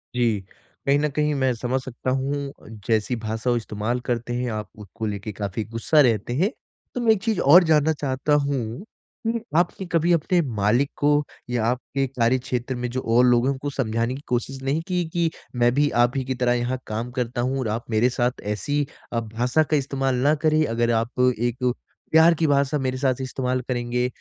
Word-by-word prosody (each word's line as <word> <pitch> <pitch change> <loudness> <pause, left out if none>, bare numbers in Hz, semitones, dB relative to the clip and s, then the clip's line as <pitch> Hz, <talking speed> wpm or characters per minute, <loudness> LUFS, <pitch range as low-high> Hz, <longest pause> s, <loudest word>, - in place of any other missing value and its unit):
जी, 115 -4 +2 0.5
कहीं 140 +1 +4
न 150 - +1
कहीं 150 +1 0
मैं 130 -2 +1
समझ 125 +3 -1
सकता 130 0 -5
हूँ 140 -1 -4 0.2
जैसी 110 +1 +1
भाषा 110 +2 -2
वो 120 - +3
इस्तेमाल 110 +2 -2
करते 120 0 -1
हैं 125 0 -1
आप 105 -2 -4
उसको 110 +2 -7
लेके 105 0 -4
काफ़ी 100 +1 -4
गुस्सा 115 +7 +3
रहते 120 -3 +1
हैं। 175 +11 +2 0.5
तो 250 - -1
मैं 230 -2 +4
एक 215 -3 +2
चीज़ 220 -4 0
और 180 +1 +10
जानना 155 0 +4
चाहता 140 0 -1
हूँ, 140 - -1 0.4
उ 230 +1 0 0.2
आपने 175 +2 +1
कभी 170 0 +2
अपने 170 +2 +2
मालिक 110 +7 +2
को 145 - +2 0.4
या 120 -2 0
आपके 125 +3 -1
कार्यक्षेत्र 125 0 -1
में 125 0 -3
जो 130 +2 -3
और 125 +1 +6
लोग 120 0 +4
हैं 135 - +2
उनको 140 +1 -4
समझाने 115 -2 -1
की 140 - -8
कोशिश 130 +2 -2
नहीं 140 +4 0
कि, 180 -2 0
कि 170 -1 +2 0.3
मैं 120 0 +3
भी 145 +2 +3
आप 120 +3 0
ही 135 - 0
की 130 0 -2
तरह 125 -1 +2
यहाँ 120 +1 -1
काम 115 +3 -3
करता 125 -1 -2
हूँ 130 +2 -1
और 130 - -2
आप 110 +2 -3
मेरे 115 +2 +3
साथ 125 0 -1
ऐसी 145 +7 -1 0.3
अ, 115 - +1
भाषा 120 +6 +1
का 155 0 +1
इस्तेमाल 135 -1 -1
ना 140 +5 +3
करें। 155 0 +4
अगर 120 -2 0
आप 120 +2 -7 0.2
एक 120 0 -1 0.5
प्यार 160 +2 +7
की 160 - +3
भाषा 140 0 +2
मेरे 130 -1 -1
साथ 130 -1 0
इस्तेमाल 130 -1 -2
करेंगे 125 0 -1
125 Hz, 200 wpm, -24 LUFS, 120-145 Hz, 0.5 s, और